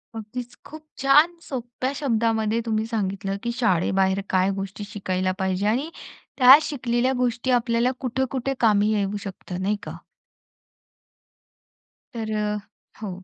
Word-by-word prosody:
अगदीच 235 +3 -7
खूप 310 +1 -10 0.2
छान 295 +6 +5
सोप्या 255 -2 -4
शब्दांमध्ये 225 -4 +1
तुम्ही 220 -1 0
सांगितलं 200 -3 -2
की 235 - -1
शाळेबाहेर 190 -1 +2
काय 185 +1 +2
गोष्टी 195 +1 -6
शिकायला 185 -2 -2
पाहिजे 190 +1 0
आणि 260 +9 0 0.5
त्या 260 +2 +10
शिकलेल्या 255 -3 0
गोष्टी 250 +1 0
आपल्याला 235 +1 +1
कुठं-कुठं 265 +1 -2
कामी 210 -2 +3
येऊ 205 0 -1
शकतं, 185 -2 -6
नाही 205 +2 +1
का? - - -7 2.2
तर 220 -2 -4
अ 210 0 -1 0.4
हो, 210 - -4
225 Hz, 120 wpm, -24 LUFS, 200-250 Hz, 2.2 s, त्या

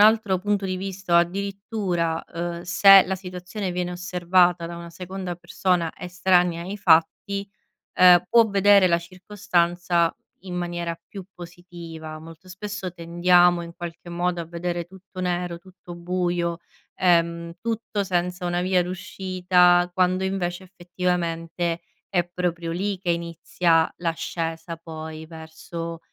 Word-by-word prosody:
altro 215 -2 +5
punto 200 +1 -1
di 185 0 -2
vista 190 -2 0
addirittura, 195 -2 -2
ehm, 170 0 -5
se 195 +2 +8
la 190 - -1
situazione 185 +1 -5
viene 180 0 -2
osservata 180 -1 +2
da 170 0 -7
una 170 0 -9
seconda 185 +1 -6
persona, 175 -1 0
estranea 180 -1 +1
ai 195 +3 -5
fatti, 200 +3 +2 0.5
ehm, 180 -1 +7
può 230 -1 +6
vedere 200 -1 +5
la 170 -1 +3
circostanza 175 -2 0 0.3
in 180 -2 -6
maniera 175 -1 -3
più 195 -3 -8
positiva. 170 -3 -9
Molto 165 +3 -13
spesso 195 -1 -6
tendiamo, 175 +1 +3
in 170 0 -10
qualche 175 0 -8
modo, 175 0 -1
a 165 - -7
vedere 170 0 -4
tutto 190 +1 -13
nero, 175 -1 -2
tutto 180 -1 -13
buio, 175 -1 -1 0.4
ehm, 170 -1 +1
tutto 225 -2 -2
senza 180 0 -1
una 175 0 0
via 185 0 +2
d'uscita, 180 -1 +2
quando 185 +1 +2
invece, 190 -1 -2
effettivamente, 175 -2 -2 0.3
è 175 -3 +2
proprio 175 -1 -3
lì 195 +3 -2
che 180 -2 -4
inizia 170 0 +1
l'ascesa, 165 0 -3
poi, 160 -1 -8
verso, 165 +1 -8
175 Hz, 130 wpm, -24 LUFS, 170-185 Hz, 0.5 s, se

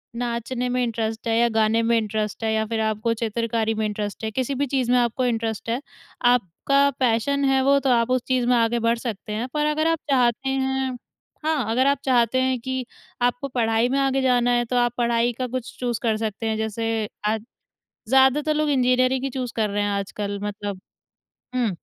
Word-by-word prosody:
नाचने 240 +1 -2
में 250 0 0
इंटरेस्ट 225 -1 -3
है 225 0 +2
या 235 0 +4
गाने 220 0 +2
में 230 0 +3
इंटरेस्ट 215 0 -2
है 220 0 +1
या 220 0 +1
फ़िर 225 +1 -2
आपको 215 +2 -1
चित्रकारी 230 0 -1
में 220 0 -1
इंटरेस्ट 210 0 -4
है 220 - -2
किसी-भी 265 +4 -1
चीज़ 250 -2 +1
में 250 - +5
आपको 240 +2 0
इंटरेस्ट 225 -2 -2
है 240 +4 -1 0.5
आपका 260 +7 +2
पैशन 260 +4 +1
है 270 -1 +3
वो 280 +1 +4
तो 275 - 0
आप 235 -1 +3
उस 255 -1 +2
चीज़ 255 -2 +1
में 250 - +4
आगे 230 +1 +2
बढ़ 230 +1 +1
सकते 220 -3 -5
हैं, 225 +4 -2
पर 300 0 +1
अगर 305 +1 +1
आप 330 -1 +1
चाहते 255 0 +2
हैं 265 -1 -1 0.5
हाँ, 290 -9 0
अगर 255 +4 +3
आप 280 0 +3
चाहते 250 -1 +3
हैं 260 -1 +1
कि 260 +1 -3 0.4
आपको 245 +3 0
पढ़ाई 230 -2 +1
में 270 - 0
आगे 270 0 +1
जाना 245 -2 +3
है 240 0 +2
तो 250 - -3
आप 240 -1 +2
पढ़ाई 235 0 +2
का 255 - -1
कुछ 250 0 -5
चूज़ 240 -2 -1
कर 220 -2 +1
सकते 220 0 -3
हैं 220 - -1
जैसे 220 0 -2 0.2
आज 215 0 0 0.7
ज़्यादातर 265 +4 +4
लोग 305 0 +1
इंजीनियरिंग 255 -1 +2
ही - - 0
चूज़ 250 -2 -4
कर 220 -2 +1
रहे 205 +1 0
हैं 205 - 0
आजकल 200 0 -3
मतलब 205 -2 -4 0.7
हुँ, 245 -2 +1
240 Hz, 205 wpm, -23 LUFS, 225-260 Hz, 0.7 s, में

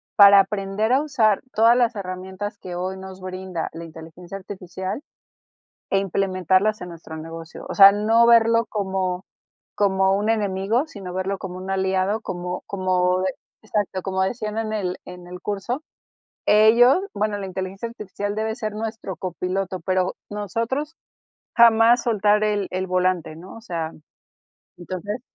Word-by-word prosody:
para 200 -1 +9
aprender 200 +3 0
a 270 - +4
usar 230 -9 +2
todas 230 +2 +5
las 245 -1 +2
herramientas 190 +1 -5
que 180 -3 -8
hoy 185 +2 -3
nos 190 0 -9
brinda 185 -2 -5
la 165 - -7
inteligencia 165 +3 -10
artificial 185 +3 -6 0.9
e 195 - +3
implementarlas 190 +2 +1
en 180 - -6
nuestro 165 -1 -9
negocio, 165 +1 -9
o - - -3
sea, 195 -1 +10
no 220 +3 +4
verlo 230 0 +5
como, 190 -3 -2 0.5
como 190 -1 +2
un 210 +2 -1
enemigo, 210 +4 +1
sino 190 -7 -8
verlo 190 +1 -2
como 185 -1 -7
un 185 +1 -7
aliado, 190 +2 +1
como 180 -2 -5
como 185 -1 +1
de 185 -1 -1 0.3
exacto, 205 -3 -2
como 190 0 -1
decían 215 +1 -3
en 220 -1 -2
el 185 -4 -2
en 180 -1 -10
el 180 0 -8
curso. 210 - -3 0.6
Ellos 230 +6 +6 0.2
bueno, 210 -1 -1
la 200 - -5
inteligencia 190 +3 -5
artificial 205 -2 -5
debe 220 +1 -1
de 220 - -3
ser 215 -3 -4
nuestro 220 -3 -5
copiloto, 185 +2 -3
pero 185 +1 0
nosotros 230 - -3 0.6
jamás 235 +1 +6
soltar 210 -2 +2
el 205 -2 0
el 185 +1 -2
volante, 180 -3 0
¿no? 175 +3 -11
O 225 - -11
sea, 165 -7 -4 0.9
entonces 185 +6 -5
195 Hz, 150 wpm, -23 LUFS, 185-215 Hz, 0.9 s, sea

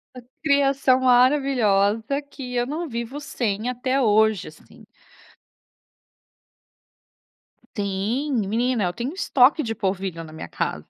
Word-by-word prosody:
Essa 245 -1 -12 0.2
criação 275 -3 +3
maravilhosa, 245 -3 +2
que 265 -3 -9
eu 240 0 +1
não 310 +4 -4
vivo 235 +4 -5
sem 235 -6 -3
até 255 +2 -1
hoje, 220 -3 +2
assim. 155 - -16 2.9
Sim, 205 +9 -2 0.2
menina 235 +1 0
eu 175 - -2
tenho 245 - -4
estoque 285 -5 +3
de 225 -3 -3
polvilho 190 -4 -3
na 155 -1 -12
minha 160 - -8
casa. - - -3
245 Hz, 115 wpm, -23 LUFS, 205-275 Hz, 2.9 s, criação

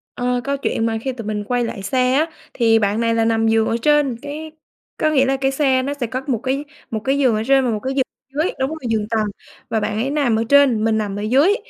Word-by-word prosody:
Ờ, 245 0 -1
câu 280 0 -1
chuyện 225 -4 -1
mà 225 -1 0
khi 265 - -2
tụi 230 -4 -7
mình 210 -1 -2
quay 245 +3 0
lại 225 -3 -4
xe 250 +5 +1
á, 300 +4 +3 0.3
thì 225 -2 +3
bạn 205 +1 0
này 230 0 +1
là 225 0 +2
nằm 225 0 +2
giường 225 0 +3
ở - - 0
trên, 295 -3 +2
cái 305 +2 -7 0.5
có 310 - +2
nghĩa 275 -3 +3
là 270 0 +1
cái 270 0 0
xe 270 -2 +2
nó 280 +2 -2
sẽ 270 -5 -3
có 255 +3 -3
một 255 -4 +1
cái 270 +2 -1 0.3
một 220 - -1
cái 270 +6 0
giường 255 -5 +3
ở 215 - -1
trên 270 -1 +4
và 240 - +1
một 215 - -2
cái 260 +5 -3
giường 270 -1 +2
ở 275 +4 -5
dưới 360 - -1
đúng 265 0 0
rồi, 320 +1 -6
giường 215 -2 0
tầng 220 -2 +1 0.4
và 220 - +1
bạn 210 0 -2
ấy 245 +5 -1
nằm 280 -6 +1
ở 225 - +1
trên, 280 -6 +5
mình 220 -1 +2
nằm 205 -2 -2
ở - - -4
dưới. 275 - +3
250 Hz, 280 wpm, -20 LUFS, 225-275 Hz, 0.5 s, trên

